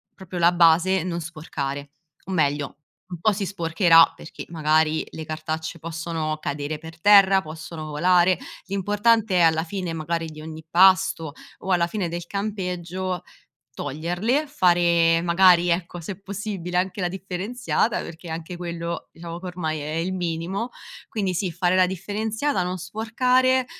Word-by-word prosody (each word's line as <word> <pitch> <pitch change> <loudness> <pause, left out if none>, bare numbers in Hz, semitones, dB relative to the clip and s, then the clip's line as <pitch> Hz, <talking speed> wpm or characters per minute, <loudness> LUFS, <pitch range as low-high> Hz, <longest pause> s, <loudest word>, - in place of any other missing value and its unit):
proprio 185 -2 -7
la 170 +1 +5
base, 175 +2 +4
non 170 -2 -3
sporcare; 145 -4 -5 0.3
o 190 - -7
meglio, 145 -3 +1 0.5
un 175 - -6
po' 215 - +4
si 200 0 -2
sporcherà 165 -2 +4
perché - - -9
magari 155 -1 +2
le 160 - -7
cartacce 155 +1 -4
possono 165 -1 -3
cadere 145 +2 -3
per 160 +1 -12
terra, 195 0 +6
possono 160 0 -8
volare, 175 +4 +3 0.3
l'importante 205 +1 +2
è - - +4
alla 160 -1 +4
fine 180 -1 -4
magari 165 +1 -2
di 155 -1 -10
ogni 160 0 -8
pasto 185 -3 +4 0.3
o 190 - -4
alla 170 -1 +3
fine 190 -1 -2
del 170 0 -5
campeggio 185 -3 -3 0.5
toglierle, 175 - -1
fare 170 - +3
magari 175 0 +5
ecco, 175 0 -1
se 190 +3 -7
possibile 195 -3 -4
anche 190 +2 -1
la 180 - +1
differenziata, 195 +5 -2
perché 165 +1 -9
anche 165 +2 -6
quello, 170 -1 -5
diciamo, 170 0 -8
che 185 - -10
ormai 160 -4 -3
è 150 +2 -5
il 170 +3 -1
minimo. 180 +5 -3 0.4
Quindi 195 -4 -2
sì, 180 0 -1
fare 175 +2 +1
la 185 -1 +5
differenziata, 210 - -2
non 180 +1 -3
sporcare. 250 +6 +1
175 Hz, 150 wpm, -24 LUFS, 165-190 Hz, 0.5 s, terra